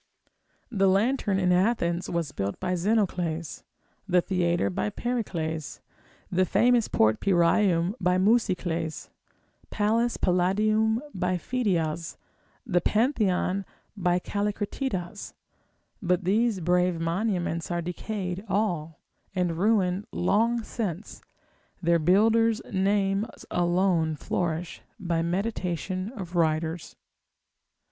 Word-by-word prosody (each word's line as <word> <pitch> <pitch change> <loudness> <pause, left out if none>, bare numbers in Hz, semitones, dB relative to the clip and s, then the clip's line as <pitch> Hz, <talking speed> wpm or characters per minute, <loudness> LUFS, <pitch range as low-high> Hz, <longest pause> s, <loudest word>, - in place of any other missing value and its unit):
The 195 -4 +3
lantern 205 +1 +2
in 180 -2 +2
Athens 180 -2 +1
was 170 -5 -2
built 100 -3 -3
by 180 0 -1
Zenocles, 180 -4 -1 0.5
the 180 -2 +4
theatre 175 - 0
by 105 +3 -1
Pericles, 165 - -3 0.5
the 185 +1 +3
famous 240 +5 +3
port 110 0 +2
Pyraeum 175 0 +3
by 180 0 +2
Musicles, 185 -6 0 0.6
Pallas 225 +3 +1
Palladium 215 +6 +2
by 180 0 0
Phidias, 170 -7 -1 0.5
the 180 -7 +1
Pantheon 205 - +1 0.3
by 180 -3 +1
Callicratidas; 205 0 -3 0.7
but 180 -1 +1
these 210 +2 +1
brave 180 0 +2
monuments 170 -1 -1
are 175 -1 -1
decayed 180 +1 -4
all, 175 -6 -1 0.4
and 175 -3 0
ruined 195 -2 +1
long 230 +6 +1
since, 205 -4 -5 0.6
their 170 -1 +2
builders' 220 +6 +3
names 195 +2 0
alone 175 -2 +1
flourish 170 +2 -3 0.2
by 170 -4 -1
meditation 185 +1 -2
of 185 -4 -7
writers. 160 0 0
185 Hz, 100 wpm, -27 LUFS, 170-210 Hz, 0.7 s, the